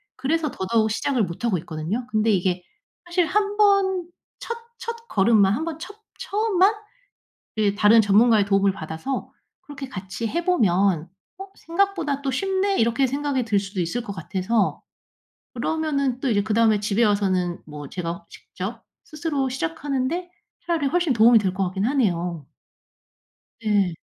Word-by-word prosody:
그래서 305 Hz, +2 st, -1 dB
더더욱 220 Hz, +3 st, 0 dB
시작을 245 Hz, +2 st, 0 dB
못 170 Hz, +4 st, -6 dB
하고 215 Hz, -6 st, +2 dB
있거든요. 170 Hz, +9 st, -4 dB
근데 215 Hz, -1 st, +1 dB
이게 180 Hz, -1 st, 0 dB, 0.4 s
사실 350 Hz, 0 st, +1 dB
한번 400 Hz, -2 st, +2 dB, 0.3 s
첫 470 Hz, -, -4 dB, 0.2 s
첫걸음만 220 Hz, -, +2 dB
한번 320 Hz, +6 st, -3 dB
첫 365 Hz, +5 st, -8 dB, 0.2 s
처음만 410 Hz, -1 st, +2 dB, 1.0 s
다른 215 Hz, +2 st, +6 dB
전문가의 210 Hz, +1 st, +4 dB
도움을 195 Hz, 0 st, +3 dB
받아서 165 Hz, +9 st, -5 dB, 0.3 s
그렇게 285 Hz, -2 st, -8 dB
같이 190 Hz, +2 st, -5 dB
해 340 Hz, +9 st, -2 dB
보면 195 Hz, -, +2 dB, 0.3 s
'어, 390 Hz, -, -7 dB
생각보다 335 Hz, -5 st, -1 dB
또 270 Hz, -, 0 dB
쉽네.' 385 Hz, +6 st, 0 dB
이렇게 235 Hz, +4 st, +2 dB
생각이 275 Hz, -1 st, -1 dB
들 210 Hz, -3 st, +2 dB
수도 195 Hz, -1 st, -4 dB
있을 175 Hz, +9 st, -2 dB
것 205 Hz, -4 st, -6 dB
같아서. 190 Hz, +4 st, -1 dB, 0.7 s
그러면은 280 Hz, -5 st, -1 dB
또 270 Hz, -, -1 dB
이제 205 Hz, -3 st, +2 dB
그다음에 220 Hz, 0 st, +3 dB
집에 210 Hz, +2 st, +1 dB
와서는 190 Hz, -4 st, +1 dB
뭐 150 Hz, -2 st, -9 dB
제가 170 Hz, -1 st, -5 dB
직접 220 Hz, +5 st, -8 dB, 0.2 s
스스로 290 Hz, -3 st, -2 dB
시작하는데 270 Hz, -, -2 dB, 0.4 s
차라리 325 Hz, -5 st, 0 dB
훨씬 345 Hz, -1 st, +1 dB
도움이 230 Hz, 0 st, +6 dB
될 190 Hz, -3 st, -1 dB
것 195 Hz, +1 st, -1 dB
같긴 190 Hz, +2 st, -2 dB
하네요. 180 Hz, -, 0 dB, 1.2 s
네. 205 Hz, -5 st, +2 dB
230 Hz, 305 characters per minute, -23 LUFS, 195-310 Hz, 1.2 s, 다른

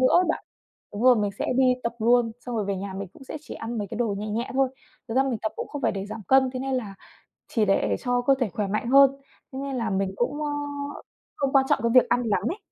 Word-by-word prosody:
nữa 255 Hz, -, +5 dB
á -, -, +2 dB
bạn. -, -, -1 dB, 0.5 s
Đúng 205 Hz, -, -4 dB
rồi, 250 Hz, -1 st, +7 dB
mình 205 Hz, -2 st, 0 dB
sẽ -, -, -1 dB
đi 255 Hz, -1 st, +4 dB
tập 235 Hz, -, -2 dB
luôn, 235 Hz, 0 st, +3 dB
xong 245 Hz, -2 st, -5 dB
rồi 210 Hz, -, 0 dB
về 200 Hz, -1 st, -2 dB
nhà 195 Hz, 0 st, -5 dB
mình 195 Hz, -1 st, -5 dB
cũng 270 Hz, -, -14 dB
sẽ 265 Hz, -, -6 dB
chỉ -, -, -9 dB
ăn 230 Hz, 0 st, -5 dB
mấy 205 Hz, -, -3 dB
cái -, -, -5 dB
đồ 225 Hz, -4 st, 0 dB
nhẹ 210 Hz, -, -4 dB
nhẹ 230 Hz, +4 st, -2 dB
thôi. 270 Hz, -1 st, +3 dB, 0.4 s
Thực 225 Hz, -, -4 dB
ra 265 Hz, -, +5 dB
mình 260 Hz, -4 st, -1 dB
tập 220 Hz, -, -1 dB
cũng -, -, -5 dB
không 290 Hz, -2 st, -6 dB
phải -, -, +2 dB
để 195 Hz, 0 st, -4 dB
giảm 215 Hz, +1 st, -7 dB
cân, 265 Hz, -1 st, +5 dB
thế 255 Hz, -, -4 dB
nên 270 Hz, 0 st, -2 dB
là 215 Hz, -6 st, -3 dB, 0.5 s
chỉ 220 Hz, -3 st, +1 dB
để 195 Hz, -, +2 dB
cho 245 Hz, -1 st, 0 dB
cơ 275 Hz, +3 st, +4 dB
thể 250 Hz, -5 st, +1 dB
khỏe 205 Hz, -2 st, -1 dB
mạnh 215 Hz, +4 st, -2 dB
hơn, 275 Hz, 0 st, +7 dB, 0.4 s
thế 265 Hz, -, -4 dB
nên 275 Hz, -1 st, -3 dB
là 230 Hz, -3 st, -1 dB
mình 195 Hz, -1 st, -1 dB
cũng, 290 Hz, +7 st, -1 dB
ơ, 295 Hz, -, -1 dB, 0.9 s
không 275 Hz, -2 st, -1 dB
quan 265 Hz, -1 st, +5 dB
trọng -, -, +3 dB
cái 235 Hz, -, +3 dB
việc 255 Hz, -, +6 dB
ăn 245 Hz, -, +3 dB
lắm 205 Hz, -5 st, +1 dB
ấy. 395 Hz, -, -5 dB
240 Hz, 285 wpm, -25 LUFS, 210-265 Hz, 0.9 s, rồi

